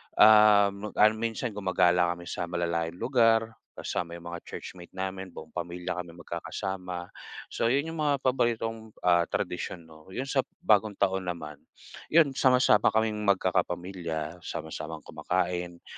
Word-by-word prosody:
Um, 105 -1 +6
mag - - -26
ano 105 +1 +7
minsan 115 -1 -3
gumagala 90 -2 +3
kami 85 0 -11
sa - - -3
malalayong 85 -1 -2
lugar, 115 -3 +3 0.2
kasama 85 -1 -4
yung 85 0 -10
mga 85 - -5
churchmate 90 -1 -9
namin. 95 -1 -4
Buong 80 0 -10
pamilya 90 0 -4
kami 85 -1 -7
magkakasama. 90 +1 -5 0.4
So 115 - 0
yun 140 +6 +1
yung 165 - -7
mga 145 -3 +1
paboritong, 115 -3 -1
ah, 85 -1 +4
tradisyon 90 -1 -3
'no. 80 0 -17
'Yung 130 - -1
sa 135 - +1 0.2
Bagong 105 -1 +3
Taon 95 -1 0
naman, 75 -4 -5 0.5
yun 155 -3 +5
sama-sama 125 -5 +4
kaming 110 -1 +1
magkakapamilya, 90 -3 -1
sama-samang 80 -1 -6
kumakain, 90 -1 -2
95 Hz, 140 wpm, -28 LUFS, 85-110 Hz, 0.5 s, ano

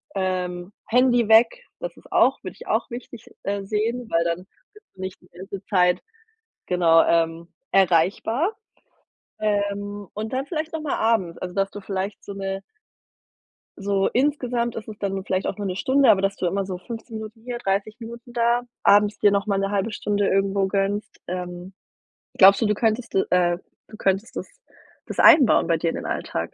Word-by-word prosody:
Ähm, 180 -1 -2 0.2
Handy 245 -1 +3
weg. 240 - +5 0.2
Das - - -6
ist - - -17
auch - - +4
würde - - -7
ich - - -12
auch - - 0
wichtig, 240 -1 -9 0.2
äh, 200 0 -2
sehen, 220 +4 -2
weil 165 0 +3
dann 170 +3 -2 0.3
bist 425 +1 -19
du 190 - -11
nicht 190 0 -6
die 180 - -21
ganze 190 +2 -8
Zeit, 180 -3 +2 0.7
genau, 165 -2 +5
ähm, 165 0 0 0.2
erreichbar. 195 - +2 0.9
Ähm, 205 -1 -2
und 215 +1 -5
dann 265 +1 -1
vielleicht 315 -1 -3
noch 320 - -3
mal 300 -3 -1
abends. 220 -7 +1
Also, 180 -1 -5
dass 195 0 +1
du 205 - -8
vielleicht 195 +1 -4
so 200 - -6
'ne 195 0 -4 1.2
So 195 -1 +1
insgesamt 250 -3 0
ist 225 - -7
es 215 -2 -8
dann 195 -1 -2
vielleicht 185 0 -1
auch - - -3
nur 205 -1 -3
'ne 185 - -3
Stunde, 265 +4 +3
aber 195 -3 +5
dass 195 0 0
du - - -2
immer 195 +2 0
so 185 -1 -5
15 225 +3 -8
Minuten 220 +1 -9
hier, 245 0 -4
30 205 0 -2
Minuten 235 +1 -10
da, 240 0 +2 0.2
abends 205 +1 +5
dir 205 - +5
noch 200 +1 0
mal 200 - +1
'ne 195 - 0
1/2 205 +2 -1
Stunde 205 -1 0
irgendwo 195 0 +1
gönnst. 200 +2 -2
Ähm, 180 +1 -6 0.6
glaubst 195 +3 +7
du, - - +3
du 210 0 +2
könntest 225 +2 0
äh, 180 -2 +2 0.3
du 215 - -12
könntest 195 +4 -1
das - - -5 0.6
das - - -6
einbauen 270 -7 +7
bei 165 - +3
dir 165 +1 0
in - - -3
den - - -6
Alltag? 85 +1 -3
200 Hz, 185 wpm, -23 LUFS, 190-230 Hz, 1.2 s, glaubst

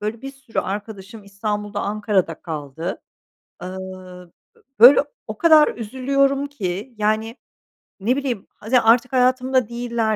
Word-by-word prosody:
böyle, 215 +2 -4
bir 270 - -6
sürü 270 -4 -8
arkadaşım 205 +1 -5
İstanbul'da 205 +1 -4
Ankara'da 205 -4 0
kaldı. 160 +2 -5 0.6
Iıı, 185 -1 -9 0.2
b - - -26 0.2
böyle, 255 +5 +9 0.2
o 215 -1 -6
kadar 315 -3 +6
üzülüyorum 275 +4 0
ki. 210 -3 -5
Yani, 215 +2 0 0.6
ne 225 +6 +1
bileyim, 260 -7 -3
hadi 240 +4 +1
artık 235 +2 +3
hayatımda 255 -1 +2
değiller 235 -2 -1
220 Hz, 125 wpm, -21 LUFS, 195-255 Hz, 0.6 s, böyle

